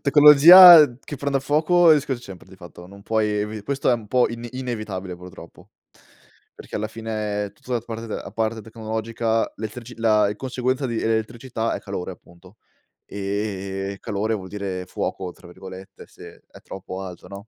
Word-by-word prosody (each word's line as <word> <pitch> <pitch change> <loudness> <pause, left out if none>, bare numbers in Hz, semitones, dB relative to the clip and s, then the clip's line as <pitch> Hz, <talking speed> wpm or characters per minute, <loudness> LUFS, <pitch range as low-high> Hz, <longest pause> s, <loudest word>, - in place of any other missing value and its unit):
tecnologia 150 +1 +9
che 145 - -8
prende 140 0 -2
a - - -1
fuoco 155 +5 +3
il 160 - +8
rischio 140 -2 -2
ce 120 - -16
sempre 95 -4 -12
di 95 - -15
fatto, 90 -1 -13
non 100 +2 -15
puoi 110 0 0
evi 105 0 -3
questo 140 +4 -1
è - - +4
un 115 -3 -3
po' 125 +3 +2
in 115 0 -7
inevitabile 110 -8 -5
purtroppo, 90 +1 -14 0.8
perché - - -9
alla 110 0 -3
fine, 105 -2 -4
tutta 125 - -10
la 120 - 0
parte 115 -1 -8
a - - -7
parte 110 0 -2
tecnologica, 110 +1 -3
lettrici 115 +3 -8
la 105 -2 +2
conseguenza 130 +2 -2
di 115 -2 -3
elettricità 115 +1 -2
è - - -5
calore 95 -2 -6
appunto, 90 +3 -19 0.5
ehm, 100 -1 -4
calore, 110 0 -3
vuol 95 -3 -6
dire 95 -3 -5
"fuoco" 95 0 -5
tra 90 - -17
virgolette 95 +1 -12
se - - -15
è - - -15
troppo 95 0 -8
alto, 90 -2 -10
no? 100 +2 -10
110 Hz, 170 wpm, -22 LUFS, 100-120 Hz, 0.8 s, tecnologia